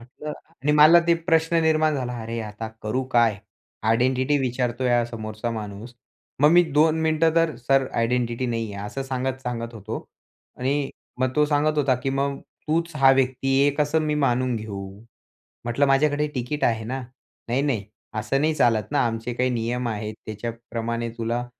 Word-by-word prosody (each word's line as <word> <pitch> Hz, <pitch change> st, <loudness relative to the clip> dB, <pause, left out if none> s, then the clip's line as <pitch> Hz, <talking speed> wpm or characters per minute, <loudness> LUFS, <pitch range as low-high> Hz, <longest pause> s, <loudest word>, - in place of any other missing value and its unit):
म्हटलं 140 Hz, +5 st, -8 dB, 0.3 s
आणि 150 Hz, +1 st, +2 dB
मला 155 Hz, +3 st, +8 dB
ते 170 Hz, -, +5 dB
प्रश्न 165 Hz, 0 st, +1 dB
निर्माण 155 Hz, -1 st, +3 dB
झाला. 125 Hz, -3 st, -3 dB
अरे, 115 Hz, +1 st, -4 dB
आता 110 Hz, +1 st, -6 dB
करू 110 Hz, +5 st, -1 dB
काय? 115 Hz, -4 st, +3 dB, 0.4 s
आयडेंटिटी 130 Hz, +5 st, +2 dB
विचारतोय 125 Hz, -1 st, -1 dB
हा 120 Hz, -1 st, +3 dB
समोरचा 110 Hz, 0 st, -5 dB
माणूस. 110 Hz, +1 st, -7 dB, 0.5 s
मग 150 Hz, +1 st, +6 dB
मी 175 Hz, +1 st, +7 dB
2 155 Hz, +2 st, +4 dB
मिनिटं 160 Hz, 0 st, +2 dB
तर 165 Hz, -2 st, +2 dB
सर 135 Hz, +1 st, +2 dB
आयडेंटिटी 120 Hz, +1 st, 0 dB
नाहीये 115 Hz, -3 st, -3 dB
असं 135 Hz, +6 st, -4 dB
सांगत-सांगत 125 Hz, -3 st, -3 dB
होतो. 110 Hz, +1 st, -6 dB, 0.5 s
आणि 135 Hz, +2 st, 0 dB, 0.3 s
मग 130 Hz, 0 st, +1 dB
तो 150 Hz, -, +5 dB
सांगत 150 Hz, +1 st, +1 dB
होता, 135 Hz, -3 st, +3 dB
की 135 Hz, +2 st, -3 dB
मग 140 Hz, 0 st, -1 dB, 0.3 s
तूच 165 Hz, +1 st, 0 dB
हा 135 Hz, -1 st, +6 dB
व्यक्ती 130 Hz, 0 st, 0 dB
आहे -, -, +5 dB
हे 145 Hz, -, +4 dB
कसं 150 Hz, +1 st, +2 dB
मी 150 Hz, -1 st, 0 dB
मानून 130 Hz, -4 st, +1 dB
घेऊ. 105 Hz, -3 st, -6 dB, 0.8 s
म्हटलं 120 Hz, +4 st, +1 dB
माझ्याकडे 145 Hz, +2 st, +2 dB
टिकट 130 Hz, +4 st, -2 dB
आहे 115 Hz, -1 st, +1 dB
ना? 130 Hz, +3 st, -3 dB, 0.5 s
नाही, 130 Hz, +4 st, +1 dB
नाही. 120 Hz, -9 st, 0 dB, 0.3 s
असं 110 Hz, +5 st, 0 dB
नाही 155 Hz, +1 st, +2 dB
चालत 115 Hz, -7 st, +2 dB
ना 145 Hz, -, +3 dB
आमचे 115 Hz, +1 st, -3 dB
काही 125 Hz, +1 st, +1 dB
नियम 120 Hz, +1 st, -1 dB
आहेत, 110 Hz, -1 st, -4 dB
त्याच्याप्रमाणे 115 Hz, +1 st, -4 dB
तुला, 120 Hz, +2 st, -2 dB
125 Hz, 165 wpm, -24 LUFS, 115-145 Hz, 0.8 s, मला